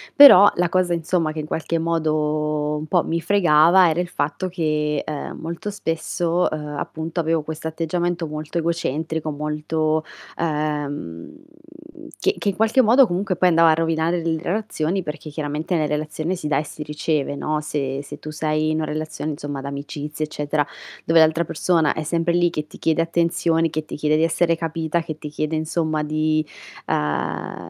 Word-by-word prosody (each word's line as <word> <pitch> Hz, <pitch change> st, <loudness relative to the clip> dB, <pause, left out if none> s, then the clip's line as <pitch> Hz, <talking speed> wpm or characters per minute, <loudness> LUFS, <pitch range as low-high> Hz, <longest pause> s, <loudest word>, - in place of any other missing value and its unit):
però 240 Hz, -9 st, +10 dB
la 175 Hz, -1 st, +2 dB
cosa, 180 Hz, 0 st, +1 dB
insomma, 165 Hz, -1 st, 0 dB
che 155 Hz, -, -6 dB
in 150 Hz, -, -3 dB
qualche 165 Hz, +1 st, -2 dB
modo 155 Hz, -2 st, 0 dB
un 155 Hz, -, -5 dB
po' 175 Hz, 0 st, +2 dB
mi 165 Hz, -, -1 dB
fregava 175 Hz, -1 st, +5 dB
era 160 Hz, -, 0 dB
il 175 Hz, -, -3 dB
fatto 150 Hz, +5 st, -2 dB
che, 150 Hz, -4 st, -1 dB
uhm, 150 Hz, -2 st, -5 dB
molto 170 Hz, +6 st, -5 dB
spesso, 170 Hz, -1 st, -1 dB
uhm, 150 Hz, -1 st, -5 dB
appunto 160 Hz, +2 st, -4 dB
avevo 165 Hz, 0 st, +1 dB
questo 160 Hz, +1 st, -5 dB
atteggiamento 170 Hz, +1 st, -2 dB
molto 155 Hz, +2 st, -5 dB
egocentrico, 160 Hz, -1 st, -2 dB
molto, 155 Hz, +1 st, -1 dB, 0.3 s
uhm 155 Hz, -2 st, 0 dB, 1.4 s
che 395 Hz, +2 st, +1 dB
che 205 Hz, -, 0 dB
in 195 Hz, -, -2 dB
qualche 225 Hz, +6 st, +4 dB
modo 250 Hz, +4 st, +6 dB
comunque 185 Hz, -1 st, -1 dB
poi 180 Hz, +1 st, +4 dB
andava 165 Hz, -1 st, +5 dB
a -, -, +5 dB
rovinare 165 Hz, +1 st, 0 dB
le 160 Hz, -1 st, -1 dB
relazioni, 190 Hz, -2 st, -1 dB
perché 155 Hz, 0 st, -6 dB
chiaramente 150 Hz, +3 st, -3 dB
nella 155 Hz, -2 st, +1 dB
relazione 155 Hz, +3 st, -2 dB
si 165 Hz, -4 st, -5 dB
dà 150 Hz, -2 st, +1 dB
e -, -, -2 dB
si 150 Hz, -, -10 dB
riceve, 150 Hz, -1 st, -1 dB
no, 155 Hz, +2 st, -1 dB
se 140 Hz, -2 st, -3 dB
se -, -, -9 dB
tu 155 Hz, -, -7 dB
sei 155 Hz, 0 st, 0 dB
in 155 Hz, -, 0 dB
una 160 Hz, -, -1 dB
relazione, 155 Hz, 0 st, -4 dB
insomma, 145 Hz, -1 st, -5 dB
d'amicizia 145 Hz, +2 st, -5 dB
eccetera, 150 Hz, -1 st, -1 dB, 0.4 s
dove 165 Hz, 0 st, +4 dB
l'altra 160 Hz, +1 st, +4 dB
persona 160 Hz, -1 st, +1 dB
è 155 Hz, -, -4 dB
sempre 165 Hz, +2 st, 0 dB
lì 175 Hz, 0 st, +3 dB
che 150 Hz, -2 st, -4 dB
ti -, -, -13 dB
chiede 160 Hz, 0 st, +2 dB
attenzioni, 165 Hz, 0 st, +1 dB
che 155 Hz, 0 st, -3 dB
ti -, -, -7 dB
chiede 150 Hz, +1 st, +2 dB
di 160 Hz, -, +2 dB
essere 165 Hz, +1 st, +2 dB
capita, 165 Hz, 0 st, -2 dB
che 155 Hz, -2 st, -6 dB
ti 155 Hz, -, -8 dB
chiede, 155 Hz, +1 st, -2 dB
insomma 155 Hz, 0 st, -1 dB
di, 155 Hz, 0 st, 0 dB, 0.4 s
uhm, 75 Hz, 0 st, -2 dB
160 Hz, 180 wpm, -22 LUFS, 150-170 Hz, 1.4 s, però